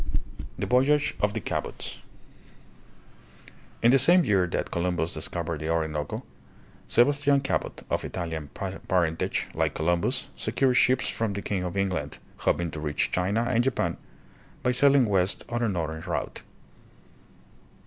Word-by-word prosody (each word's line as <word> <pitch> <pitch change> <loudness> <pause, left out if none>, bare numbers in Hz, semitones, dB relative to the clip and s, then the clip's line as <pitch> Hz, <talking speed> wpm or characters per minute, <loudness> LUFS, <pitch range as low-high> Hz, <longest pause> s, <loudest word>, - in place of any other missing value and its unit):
The - - -2
Voyage 145 +5 +3
of 105 +1 +1
the - - 0
Cabots. - - -4 1.8
In 120 - +6
the 135 - +6
same 175 +7 +6
year 95 -3 +3
that - - -3
Columbus 85 -1 -1
discovered 80 0 -3
the 80 +1 -4
Orinoco, 80 -3 -2 0.6
Sebastian 140 +3 +4
Cabot, 135 - -2
of - - -1
Italian 80 -4 -4
parentage, 90 -2 -1
like - - 0
Columbus, 85 - 0
secured 130 -2 +1
ships 130 +1 +3
from 110 -3 -2
the 100 - -5
king 95 -3 -2
of 90 +2 -4
England, 95 -1 -1 0.2
hoping 85 -2 0
to 75 - -6
reach 75 -1 -1
China 100 +6 +1
and 120 +1 +2
Japan 135 -1 0 0.7
by 125 - +3
sailing 140 +1 +5
west 95 -2 0
on 120 0 -2
a 115 - +1
northern 80 -4 -3
route. 85 -1 -4
95 Hz, 140 wpm, -27 LUFS, 85-125 Hz, 1.8 s, In